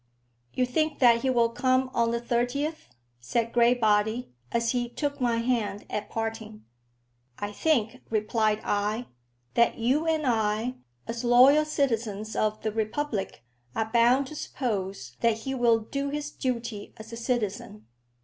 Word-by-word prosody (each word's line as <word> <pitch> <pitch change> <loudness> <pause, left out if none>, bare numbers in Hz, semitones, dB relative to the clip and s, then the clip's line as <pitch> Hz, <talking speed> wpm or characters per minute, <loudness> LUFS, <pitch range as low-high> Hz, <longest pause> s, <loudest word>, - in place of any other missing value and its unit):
"You 255 - +2
think 310 +4 0
that 235 -2 +5
he 265 - 0
will 235 -2 +3
come 255 +2 +1
on 235 -1 +2
the 235 0 0
thirtieth?" 245 - -2 0.3
said 230 - -1
Graybody, 235 - +2 0.2
as 230 0 +1
he 245 -1 -1
took 285 +2 -3
my 240 -2 +2
hand 230 -4 -1
at 210 0 -3
parting. 220 -1 -5 0.7
"I 205 0 -4
think," 250 -1 0
replied 215 0 +1
I, 210 +4 -1 0.5
"that 235 0 +3
you 265 +8 +1
and 315 -2 +1
I, 225 0 0 0.3
as 235 +1 -4
loyal 255 +5 +6
citizens 225 -8 -1
of 215 0 0
the 215 - 0
Republic, 220 - -3 0.3
are 220 0 -1
bound 245 +4 +4
to 305 - -9
suppose 195 - -4
that 225 -1 +1
he 265 +3 -3
will 240 -3 +4
do 275 +6 -3
his 295 +1 -4
duty 235 -5 -4
as 220 +1 -11
a - - -3
citizen." 215 - -3
235 Hz, 150 wpm, -27 LUFS, 215-255 Hz, 0.7 s, loyal